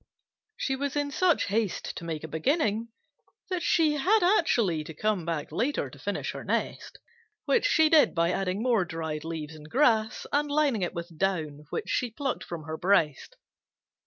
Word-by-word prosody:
She 265 - -1
was 280 +1 -3
in 290 -1 -1
such 350 +2 +2
haste 210 -1 -1
to - - -7
make 160 -2 -4
a - - -4
beginning 220 - 0 0.6
that 365 -1 -1
she 315 -3 +3
had 385 +8 +3
actually 235 - +2
to 160 - -9
come 210 -2 0
back 165 -3 -3
later 275 +6 -1
to - - -14
finish - - -3
her - - -7
nest, - - -3 0.5
which 460 -4 +3
she 320 -5 +4
did 310 -2 +5
by 170 +1 +2
adding 195 +3 -1
more 235 -6 +3
dried 160 -2 -4
leaves 160 -2 -5
and 155 -1 -12
grass 230 - +2
and 295 +1 +1
lining 285 -7 +2
it 175 - -2
with 170 0 -6
down 155 -6 -1
which - - -4
she 250 - 0
plucked 270 +3 -3
from 170 -3 -7
her 160 +1 -5
breast. 165 -7 +1
210 Hz, 180 wpm, -28 LUFS, -, 0.6 s, did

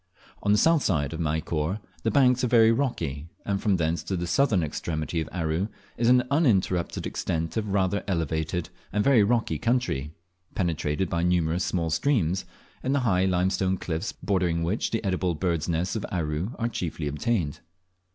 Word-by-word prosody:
On 100 - +1
the 105 - +5
south 165 +5 +4
side 75 - 0
of 80 - -5
Maykor 80 +3 -1 0.2
the - - +1
banks 125 -3 +4
are - - +3
very 115 -2 +6
rocky, 85 - -1 0.2
and 100 -1 -1
from 100 -4 +2
thence 85 0 0
to 95 - -2
the 85 - -2
southern 100 0 +2
extremity 80 +1 -2
of 80 - -5
Aru 85 +2 -1 0.3
is 115 0 +2
an 125 0 +5
uninterrupted 100 - +1
extent 80 0 -2
of 110 -2 -1
rather 100 0 +1
elevated 80 -1 -1 0.2
and 105 - +1
very 130 -3 +5
rocky 115 +3 +1
country, 115 - 0 0.4
penetrated 85 -1 0
by 85 +1 -1
numerous 85 -1 +1
small 85 -3 -1
streams, 95 - +1 0.4
in 130 - 0
the 140 - +2
high 95 -6 +2
limestone 95 +1 +1
cliffs 85 +4 -3
bordering 90 -4 0
which 90 +7 0
the 115 - -2
edible 90 -2 0
birds' 85 -1 -1
nests 85 +5 0
of 110 - -2
Aru 85 +4 -2
are 115 - 0
chiefly 85 -8 -3
obtained. 75 +1 -1
90 Hz, 170 wpm, -26 LUFS, 80-110 Hz, 0.4 s, very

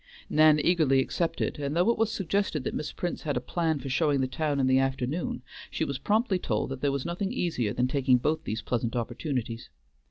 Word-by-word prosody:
Nan 155 0 +6
eagerly 150 -5 +3
accepted, 165 +3 -1
and 140 +1 -2
though 180 +7 +4
it - - -2
was 225 -1 +2
suggested 195 -5 -1
that - - -3
Miss 150 -1 -3
Prince 175 - -4
had 145 -4 -1
a - - +2
plan 160 +4 -1
for 135 - -7
showing 145 +1 +2
the 130 - +2
town 145 +1 -1
in 135 - +3
the 130 0 +4
afternoon, 135 +1 -1 0.3
she - - -1
was 140 -2 -3
promptly 210 - +1
told 110 -3 -1
that 135 -1 -5
there 145 - +2
was 140 -1 -2
nothing 185 +4 -2
easier 160 - -1
than 125 +4 +1
taking 130 -1 +3
both 155 +6 -1
these 110 +1 -4
pleasant 120 0 -1
opportunities. 120 -1 -3
140 Hz, 215 wpm, -28 LUFS, 130-170 Hz, 0.3 s, Nan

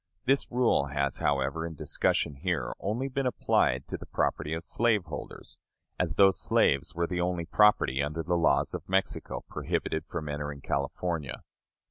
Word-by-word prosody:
This 135 +2 +2
rule 120 - +2
has, 70 -1 -1
however, 70 +2 0
in 80 -1 -5
discussion 70 0 0
here, - - -1
only 115 +7 -2
been 135 0 -1
applied 65 - +1
to - - -3
the - - -10
property 75 +1 -1
of 80 - -5
slaveholders; 105 -6 -2 0.4
as 85 -4 0
though 95 +1 +7
slaves 70 -5 +1
were 85 0 +1
the 90 0 -2
only 90 -1 -1
property 95 -8 +4
under 75 +3 -2
the 90 - -1
laws 85 -2 +2
of - - -6
Mexico 95 +1 -1
prohibited 80 - -2
from 80 -3 -5
entering 75 -1 -4
California. 70 +1 -2
80 Hz, 155 wpm, -29 LUFS, 70-95 Hz, 0.4 s, though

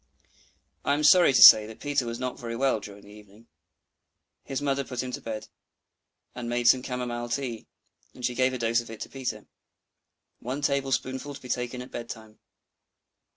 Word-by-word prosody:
I 140 - +2
am 150 - -2
sorry 175 +2 +6
to 130 - +6
say 105 -1 +10
that 110 - -11
Peter 145 -4 -1
was 115 0 -5
not 125 0 -4
very 115 -1 -5
well 130 -2 +1
during 100 -1 -11
the 105 - -15
evening. 105 +1 -17 1.0
His 135 - -4
mother 140 -1 -1
put 125 -1 -4
him 130 - -5
to - - -6
bed, 110 -1 -6 0.9
and 120 -1 -6
made 120 0 0
some 130 +2 +5
camomile 120 -2 -4
tea; 120 -3 -4 0.5
and 125 - -5
she 125 - 0
gave 130 +1 +2
a 130 - -4
dose 115 0 +1
of 115 - -13
it 115 - -10
to - - -6
Peter! 130 -2 -5 0.9
"One 130 +4 -5
tablespoonful 135 0 -1
to - - -12
be 125 - -10
taken 125 +1 -3
at 125 - -14
bed 120 -1 -7
time." 110 -1 -10
125 Hz, 190 wpm, -27 LUFS, 115-130 Hz, 1.0 s, say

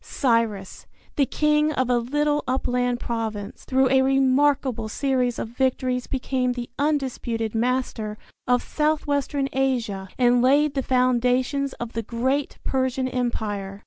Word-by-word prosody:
Cyrus, 230 -7 -1 0.3
the 280 -3 +2
king 300 +2 +2
of 260 -3 0
a 245 -1 +2
little 295 +4 0
upland 245 -1 0
province, 220 -4 -4
through 260 0 +2
a 265 0 +5
remarkable 270 -3 +2
series 250 -1 0
of - - -4
victories 255 0 -1
became 255 -1 -1
the 245 -1 -6
undisputed 260 -6 -1
master 230 -2 -1 0.3
of 250 0 +2
south 305 0 0
western 285 -1 0
Asia 235 -8 -1
and 245 -1 +4
laid 280 +3 +4
the 275 - 0
foundations 255 +2 +1
of 240 -1 -7
the 230 - -2
great 260 +6 -1
Persian 260 0 0
Empire. 210 -6 -3
255 Hz, 135 wpm, -24 LUFS, 235-270 Hz, 0.3 s, a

